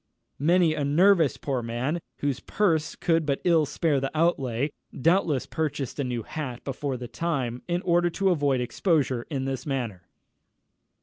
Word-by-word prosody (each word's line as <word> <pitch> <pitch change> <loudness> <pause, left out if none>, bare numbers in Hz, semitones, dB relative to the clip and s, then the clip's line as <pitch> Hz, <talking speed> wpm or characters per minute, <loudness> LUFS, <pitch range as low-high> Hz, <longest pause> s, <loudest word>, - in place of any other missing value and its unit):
_" - - -53 0.4
Many 170 0 +4
a 150 - -2
nervous 165 +2 +4
poor 135 -3 -2
man, 120 +8 -2 0.2
whose 140 -3 0
purse 165 -6 0
could 165 -1 +1
but 140 -2 0
ill 165 -4 +4
spare 155 -3 +1
the 135 0 -2
outlay, 140 -5 +1 0.3
doubtless 165 -2 +2
purchased 145 -4 -3
a - - +1
new 120 -3 -3
hat 130 -5 -6
before 135 -1 -3
the 125 0 -6
time, 125 -3 -2
in 175 0 -1
order 175 0 +3
to 195 +2 +1
avoid 145 -6 +1
exposure 130 -2 0
in 135 -4 -2
this 135 -1 -3
manner. 120 -10 -3
145 Hz, 165 wpm, -26 LUFS, 130-165 Hz, 0.4 s, Many